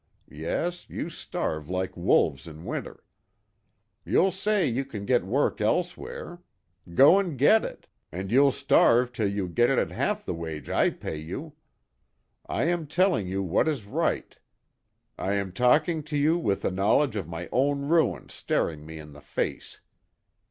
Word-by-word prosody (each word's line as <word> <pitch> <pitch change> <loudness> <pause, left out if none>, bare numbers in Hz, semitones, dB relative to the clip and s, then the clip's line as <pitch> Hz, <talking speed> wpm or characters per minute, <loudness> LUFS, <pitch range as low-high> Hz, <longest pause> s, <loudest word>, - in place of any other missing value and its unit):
Yes, 170 - -3
you - - -5
starve 80 0 -4
like 95 0 -2
wolves 70 -5 +2
in 80 +1 -10
winter. - - -5 1.0
You'll 190 +2 +3
say 195 0 +1
you 130 0 0
can 110 -7 -7
get 125 -3 +2
work 115 +3 0
elsewhere. 175 +6 -2 0.5
Go 150 - +7
and 175 -8 -3
get 215 - +5
it, - - -8 0.2
and 95 +3 -5
you'll 140 +3 +5
starve 125 0 +3
till 110 -4 0
you 100 -2 -2
get 120 +7 +2
it 135 - +2
at - - 0
half - - -1
the - - -2
wage 80 -2 -6
I - - +3
pay 80 - -6
you. 115 - -7 0.9
I - - -1
am 170 -1 0
telling 175 - +2
you 95 +1 -2
what 95 - +1
is 140 -9 -2
right. 100 - -1 0.8
I 95 - -1
am 100 -2 -1
talking 150 - +2
to 150 -1 -3
you 150 +3 +3
with 105 - -1
the - - 0
knowledge 105 +7 +2
of 95 -7 -3
my 85 +1 -6
own 140 +3 +1
ruin 165 +1 +2
staring 75 -2 -2
me 80 0 -8
in 75 -1 -11
the 75 - -13
face. - - -4
120 Hz, 165 wpm, -27 LUFS, 90-155 Hz, 1.0 s, Go